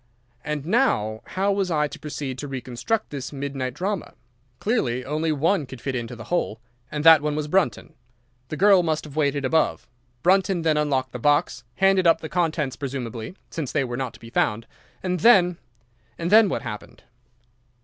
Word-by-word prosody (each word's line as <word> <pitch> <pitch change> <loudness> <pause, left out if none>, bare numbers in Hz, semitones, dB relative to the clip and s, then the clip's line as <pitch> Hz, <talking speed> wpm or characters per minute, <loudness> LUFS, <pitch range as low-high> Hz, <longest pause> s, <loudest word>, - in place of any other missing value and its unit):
"And 150 -1 -3
now 110 - +1
how 195 +2 0
was 195 -2 0
I 150 -3 +1
to - - -10
proceed 140 -3 -5
to 145 - -5
reconstruct 135 - -3
this 140 -3 -5
midnight 135 -3 -4
drama? 190 +2 -3 0.4
Clearly, 130 - -1
only 155 +3 -1
one 155 +1 +1
could 130 -1 -9
fit 135 +3 -3
into 120 -1 -4
the 115 - -9
hole, 175 -11 -2 0.3
and 150 -1 -3
that 160 -2 +8
one 150 0 -1
was 150 -1 -2
Brunton. 185 +3 0 0.5
The 155 - -5
girl 195 -1 +6
must 160 -2 -1
have 150 -2 -11
waited 145 -2 +1
above. 160 +4 +1 0.4
Brunton 190 0 +3
then 160 -1 +2
unlocked 140 -4 0
the 125 - -6
box, 145 -2 +1
handed 195 -2 +3
up 165 - +5
the 160 - -7
contents 155 -6 -1
presumably—since 130 - -6
they 140 - +1
were 120 -2 -4
not 125 -1 -4
to - - -15
be 115 0 -12
found—and 115 - -3
then—and 160 - +1
then 215 -1 +7
what - - -3
happened? 105 0 -8
150 Hz, 170 wpm, -24 LUFS, 130-175 Hz, 0.5 s, that